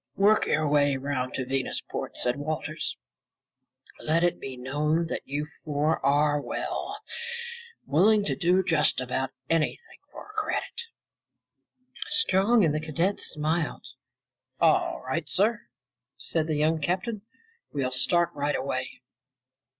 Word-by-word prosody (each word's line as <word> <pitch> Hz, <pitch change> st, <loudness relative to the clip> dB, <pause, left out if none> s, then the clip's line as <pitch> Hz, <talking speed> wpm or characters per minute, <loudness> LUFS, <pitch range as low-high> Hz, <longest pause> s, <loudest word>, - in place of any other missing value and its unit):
"Work 210 Hz, +2 st, +4 dB
your 155 Hz, 0 st, +2 dB
way 145 Hz, -1 st, +3 dB
around 130 Hz, -1 st, -2 dB
to 130 Hz, -, -2 dB
Venusport," 135 Hz, 0 st, -3 dB
said 125 Hz, +2 st, +1 dB
Walters. 155 Hz, +1 st, -3 dB, 1.0 s
"Let 165 Hz, +2 st, +1 dB
it 175 Hz, -, +2 dB
be 130 Hz, -1 st, -6 dB
known 150 Hz, +6 st, 0 dB
that 165 Hz, -, -3 dB
you 145 Hz, +2 st, -2 dB, 0.2 s
four 150 Hz, +1 st, 0 dB
are 145 Hz, +1 st, +3 dB
well, -, -, -4 dB, 0.9 s
willing 200 Hz, +7 st, +4 dB
to -, -, 0 dB
do 185 Hz, +1 st, +3 dB
just 165 Hz, -7 st, +2 dB
about 130 Hz, +1 st, -1 dB, 0.2 s
anything 165 Hz, -, -1 dB
for -, -, -10 dB
a -, -, -21 dB
credit." 430 Hz, +2 st, -2 dB, 1.2 s
Strong 220 Hz, -, +4 dB
and 150 Hz, -, +2 dB
the 155 Hz, -, 0 dB
cadets 165 Hz, +6 st, 0 dB
smiled. 155 Hz, +1 st, -1 dB, 0.7 s
"All 60 Hz, -, +3 dB
right, -, -, -2 dB
sir," 210 Hz, +3 st, +2 dB, 0.5 s
said 160 Hz, -1 st, 0 dB
the 155 Hz, -, 0 dB
young 155 Hz, +2 st, +2 dB
captain. 190 Hz, +7 st, -1 dB, 0.5 s
"We'll 135 Hz, -3 st, -1 dB
start 170 Hz, +7 st, +3 dB
right 145 Hz, +1 st, -1 dB
away." 130 Hz, -2 st, -3 dB
155 Hz, 125 wpm, -27 LUFS, 140-175 Hz, 1.2 s, Work